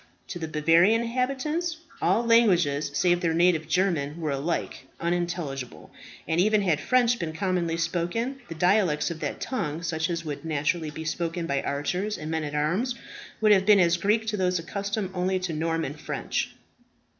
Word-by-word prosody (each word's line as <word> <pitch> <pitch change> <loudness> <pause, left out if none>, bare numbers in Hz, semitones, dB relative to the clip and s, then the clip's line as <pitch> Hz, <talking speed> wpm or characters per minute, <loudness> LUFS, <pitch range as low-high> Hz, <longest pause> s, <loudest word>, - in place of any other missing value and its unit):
To 175 - -5
the 160 - -3
Bavarian 165 +8 +4
inhabitants, 275 +8 -1 0.2
all 235 - +2
languages, 180 -12 +3
save 175 +4 +2
their 165 -3 +1
native 170 -2 +3
German, 165 -3 0
were 155 -3 -2
alike 140 +5 -3
unintelligible; 170 -7 -3 0.4
and 165 +2 +2
even 210 +1 +3
had 165 -6 +2
French 245 -1 +2
been 160 -2 -3
commonly 175 -2 -1
spoken, 175 +10 -2
the 165 - -6
dialects 180 -2 +2
of 165 - -6
that - - -4
tongue, 165 - -3
such 160 -1 -1
as 170 -1 -3
would 150 0 -5
naturally 155 +1 -1
be 160 +1 -7
spoken 165 +1 -2
by 140 -3 0
archers 180 +9 -2
and 155 +1 -5
men 160 -1 -1
at 150 0 -4
arms, 185 - 0 0.5
would 215 -1 +5
have 195 -1 +4
been 210 -2 +7
as 170 -1 +4
Greek 210 +5 +1
to 215 -1 -2
those 180 -1 +1
accustomed 200 +3 -3
only 185 +1 0
to 185 -3 -3
Norman 165 -2 -1
French. 150 - -3
175 Hz, 170 wpm, -26 LUFS, 160-200 Hz, 0.5 s, been